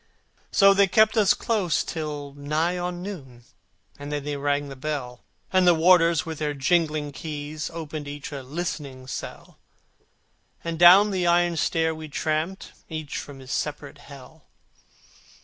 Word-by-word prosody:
So 195 -1 +6
they 200 0 +4
kept 220 +3 +4
us 210 -3 +4
close 195 -9 0
till 150 -3 -5
nigh 150 +5 -1
on 180 0 -4
noon, 135 -12 -9 0.6
And 145 +1 -7
then 145 -1 -3
they 145 0 -3
rang 145 0 -1
the 135 - -8
bell, 130 -3 -5 0.3
And 185 -1 +4
the 175 - +6
warders 165 -1 +4
with 160 -2 -6
their 150 -1 -2
jingling 155 0 +1
keys 150 +1 -6
Opened 155 -3 -6
each 145 +1 -7
listening 140 -1 -5
cell, 130 - -8 1.0
And 165 -1 -4
down 190 +4 +8
the 185 -2 0
iron 175 0 +3
stair 160 0 +1
we 155 0 -8
tramped, 155 +5 -3 0.2
Each 155 -3 -5
from 145 -2 -9
his 130 0 -10
separate 145 -1 -4
Hell. 140 +3 -14
155 Hz, 150 wpm, -25 LUFS, 145-175 Hz, 1.0 s, down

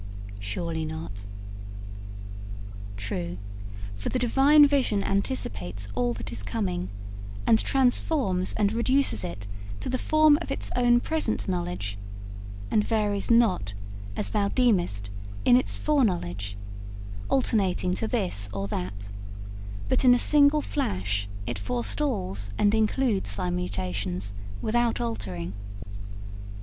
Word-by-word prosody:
'Surely 160 - -3
not.' 155 -11 -6 1.7
'True, 90 -3 -3 0.6
for 100 - -4
the - - 0
Divine 270 +5 +6
vision 260 -8 +2
anticipates 100 - -2
all 120 +2 +1
that 115 - -6
is 115 -3 -4
coming, 95 -3 -2 0.6
and 220 - +5
transforms 250 - +2
and 210 0 +1
reduces 235 - +2
it 95 +3 -5 0.3
to - - -4
the 255 - 0
form 310 -1 +5
of - - -6
its 275 - -1
own 240 -1 +5
present 310 -4 -1
knowledge, 100 - -3 0.7
and 210 - +4
varies 210 -3 0
not, 220 - +3 0.4
as 100 - -2
thou 200 - +2
deemest, 175 - +1 0.3
in - - +7
its 255 - +2
foreknowledge, 170 - 0 0.7
alternating 195 -8 +2
to 220 - -1
this 180 - -1
or 100 0 -3
that, 100 +2 -4 0.8
but - - +2
in 250 -1 +7
a - - +3
single 290 +2 +5
flash 100 - -1 0.2
it 120 - -3
forestalls 230 - 0
and 205 0 +3
includes 220 - +1
thy 90 -3 -1
mutations 90 +1 -2 0.3
without 240 +1 +1
altering. 95 -6 -3
180 Hz, 115 wpm, -27 LUFS, -, 1.7 s, in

